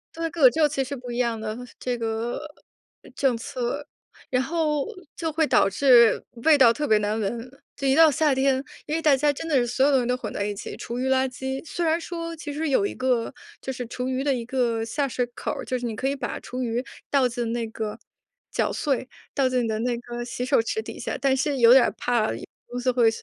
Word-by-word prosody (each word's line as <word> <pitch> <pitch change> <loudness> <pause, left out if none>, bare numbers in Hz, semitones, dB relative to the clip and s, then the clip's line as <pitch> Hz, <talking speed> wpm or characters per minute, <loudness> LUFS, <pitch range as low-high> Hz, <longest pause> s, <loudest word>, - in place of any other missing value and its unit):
对， 330 0 -2
各 335 - -6
个 255 - +10
州 310 +1 +3
其 275 -2 -1
实 255 - -9
是 280 - -3
不 245 -1 -8
一 240 - -4
样 235 -2 0
的 220 0 -4 0.2
这 245 -1 -2
个 225 +1 -2 0.8
政 260 -4 +2
策， 275 +2 -4 0.5
然 255 - +2
后 300 0 0 0.3
就 325 -2 -2
会 315 +1 +2
导 245 -6 +4
致 235 +1 +5 0.2
味 315 -2 +6
道 235 -4 +7
特 295 +3 -2
别 215 - +5
难 210 +1 -1
闻。 230 +4 -3 0.3
就 275 - -2
一 265 - +4
到 320 -2 +7
夏 290 0 +2
天 265 0 +2 0.3
因 300 - -3
为 325 - -1
大 300 -3 +5
家 290 +2 +2
真 325 +3 -6
的 300 - +1
是 245 - +4
所 265 +3 +2
有 290 - +4
东 265 - +4
西 240 - -2
都 250 0 +1
混 - - -6
在 200 - -2
一 210 - -2
起， - - -7
厨 240 +1 -5
余 260 - -1
垃 265 0 +3
圾 265 +1 -5
虽 335 +1 -3
然 325 +1 +2
说 335 -1 -5
其 305 -2 -6
实 305 +1 -2
有 400 +9 +3
一 - - -2
个 255 -3 0 0.3
就 265 - -4
是 245 -1 -5
厨 250 +2 -4
余 260 +1 -1
的 280 -2 +2
一 240 -2 -3
个 235 -3 0
下 275 +5 -1
水 250 -1 -1
口 - - -3
儿， - - -5
就 255 - -2
是 245 - -5
你 225 -2 -3
可 265 - -2
以 280 - -1
把 275 - -4
厨 255 +1 -5
余 240 +1 -1 0.3
倒 270 -3 +3
进 235 -1 -3
那 235 -1 -1
个 220 -1 -5 0.5
绞 - - 0
碎， 270 -4 -1 0.3
倒 270 -2 +3
进 255 -1 +1
你 230 - -1
的 215 -1 -1
那 240 +1 0
个 240 0 -6
洗 245 0 -4
手 260 -2 +3
池 440 - -2
底 - - -9
下， - - -3
但 270 -1 +3
是 285 0 0
有 235 0 +7
点 260 -1 +8
儿 - - 0
怕 235 -3 +1
由 245 +1 -9
此 255 - +3
会 235 -2 +4
255 Hz, 270 characters per minute, -25 LUFS, 240-285 Hz, 0.8 s, 个